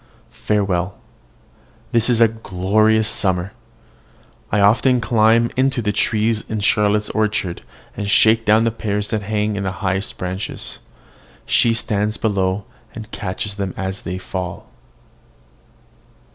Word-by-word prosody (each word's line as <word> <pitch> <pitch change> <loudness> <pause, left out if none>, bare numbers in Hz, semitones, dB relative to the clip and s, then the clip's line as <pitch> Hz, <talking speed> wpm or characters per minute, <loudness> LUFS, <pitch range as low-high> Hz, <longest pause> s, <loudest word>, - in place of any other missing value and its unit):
Farewell! 100 -3 0 0.9
This 115 +1 +2
is 120 -2 +2
a 115 - +8
glorious 110 +1 +1
summer. 95 -3 0 1.0
I 105 - +2
often 115 +5 +4
climb 115 +1 +3
into 130 0 +1
the 105 -3 0
trees 110 +1 +1
in 110 -1 -2
Charlotte's 105 +1 +2
orchard, 105 -5 -1 0.3
and 100 -1 -3
shake 110 +2 +5
down 110 +1 +4
the 115 - +1
pears 105 -2 -3
that 110 -2 0
hang 105 +1 -1
on - - -2
the 95 -1 -2
highest 95 +2 -1
branches. 90 +1 -5 0.7
She 115 -1 +3
stands 105 -1 -1
below, 95 -2 0 0.3
and 110 -1 -9
catches 95 +2 -4
them 95 -2 -3
as 95 0 -4
they 90 +2 -4
fall. 90 -1 -6
105 Hz, 130 wpm, -20 LUFS, 95-110 Hz, 1.0 s, a